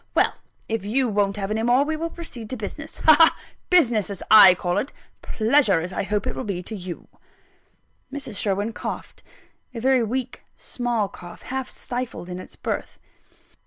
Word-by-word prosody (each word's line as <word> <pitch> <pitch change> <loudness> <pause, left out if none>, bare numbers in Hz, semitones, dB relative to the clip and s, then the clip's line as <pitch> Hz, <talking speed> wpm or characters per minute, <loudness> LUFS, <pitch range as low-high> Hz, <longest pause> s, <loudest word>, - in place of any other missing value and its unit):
Well, - - +3 0.3
if 225 -3 -2
you 245 +6 +1
won't 205 -2 0
have 200 0 -3
any 220 +1 0
more, 245 +4 +3
we 315 +1 -1
will 330 +2 -3
proceed 255 -11 -7
to 260 - -3
business. 305 +9 -7
Ha! 315 - +9
ha! 325 - +6 0.3
business 240 - +3
as 200 - -6
I 200 -4 +10
call 175 0 -1
it; 275 - -4 0.3
pleasure 215 - +2
I - - 0
hope 205 +1 -1
it - - -2
will 130 - -4
be 185 -3 -4
to 220 - -6
you." 180 -3 -7 1.0
Mrs. 270 -6 -6
Sherwin 205 +2 -1
coughed - - -6 0.5
a - - -3
very 260 +1 +3
weak, 245 +3 -3
small 240 -4 -2
cough, 175 -2 -12
half 265 0 -4
stifled 245 -7 -5
in 180 0 -5
its - - -10
birth. - - -4
220 Hz, 175 wpm, -23 LUFS, 200-260 Hz, 1.0 s, I